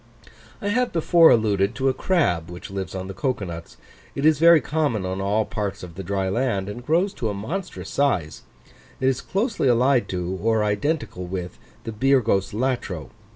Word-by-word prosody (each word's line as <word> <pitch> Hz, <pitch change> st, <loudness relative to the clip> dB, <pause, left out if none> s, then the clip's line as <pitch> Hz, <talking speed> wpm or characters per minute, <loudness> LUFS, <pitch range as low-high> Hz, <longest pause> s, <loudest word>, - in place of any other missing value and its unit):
I 205 Hz, -, 0 dB
have 245 Hz, +4 st, +1 dB
before 165 Hz, 0 st, +5 dB
alluded 105 Hz, -1 st, +2 dB
to 135 Hz, 0 st, 0 dB
a 130 Hz, -, +3 dB
crab 130 Hz, -, 0 dB
which 90 Hz, +2 st, -9 dB
lives 95 Hz, -1 st, -5 dB
on 95 Hz, 0 st, -4 dB
the 95 Hz, -, -6 dB
cocoa 130 Hz, -2 st, -2 dB
nuts; 85 Hz, -1 st, -8 dB, 0.4 s
it 140 Hz, -, -1 dB
is 155 Hz, -2 st, +4 dB
very 170 Hz, 0 st, +7 dB
common 145 Hz, -11 st, -1 dB
on 95 Hz, +1 st, -3 dB
all 105 Hz, +2 st, +1 dB
parts 100 Hz, -3 st, -4 dB
of 90 Hz, -2 st, -9 dB
the 95 Hz, -, -7 dB
dry 95 Hz, +1 st, -2 dB
land, 100 Hz, -2 st, -1 dB
and 105 Hz, +4 st, -7 dB
grows 175 Hz, +8 st, +1 dB
to 115 Hz, -, -3 dB
a 100 Hz, -, -3 dB
monstrous 170 Hz, -, -5 dB
size: 95 Hz, -, 0 dB, 0.6 s
it 130 Hz, -, +1 dB
is 135 Hz, 0 st, +1 dB
closely 205 Hz, -, -1 dB
allied 125 Hz, +1 st, +3 dB
or 95 Hz, +5 st, 0 dB
identical 105 Hz, -, -1 dB
with 90 Hz, -1 st, -5 dB, 0.2 s
the 115 Hz, -, -5 dB
Birgos 115 Hz, -5 st, +2 dB
latro. 110 Hz, -8 st, -2 dB
110 Hz, 180 wpm, -23 LUFS, 95-140 Hz, 0.6 s, very